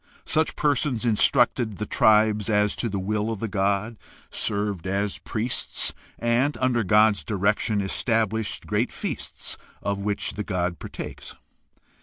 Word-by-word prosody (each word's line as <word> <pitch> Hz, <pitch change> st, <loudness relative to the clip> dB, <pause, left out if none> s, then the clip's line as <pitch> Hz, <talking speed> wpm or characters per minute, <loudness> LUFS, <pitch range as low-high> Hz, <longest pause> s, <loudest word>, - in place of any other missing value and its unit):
Such 155 Hz, 0 st, +1 dB
persons 140 Hz, -5 st, +1 dB
instructed 115 Hz, 0 st, +3 dB
the 105 Hz, -, -3 dB
tribe 105 Hz, 0 st, +3 dB
as 105 Hz, -1 st, +2 dB
to 115 Hz, -, -1 dB
the 100 Hz, -, -2 dB
will 105 Hz, +3 st, -1 dB
of 110 Hz, -, -4 dB
the 115 Hz, -, -2 dB
god, 100 Hz, +2 st, 0 dB, 0.3 s
served 100 Hz, -3 st, -1 dB
as 100 Hz, +1 st, -1 dB
priests, 120 Hz, +3 st, -2 dB, 0.2 s
and, 120 Hz, +5 st, +1 dB
under 130 Hz, -2 st, +1 dB
the 115 Hz, -, 0 dB
god's 105 Hz, +1 st, +4 dB
direction, 105 Hz, +1 st, +1 dB
established 110 Hz, +1 st, 0 dB
great 105 Hz, +4 st, 0 dB
feasts -, -, -5 dB, 0.2 s
of 100 Hz, -1 st, -1 dB
which 100 Hz, 0 st, -1 dB
the 105 Hz, -, -3 dB
god 90 Hz, -3 st, -2 dB
partakes. -, -, -7 dB
105 Hz, 140 wpm, -25 LUFS, 100-115 Hz, 0.3 s, god's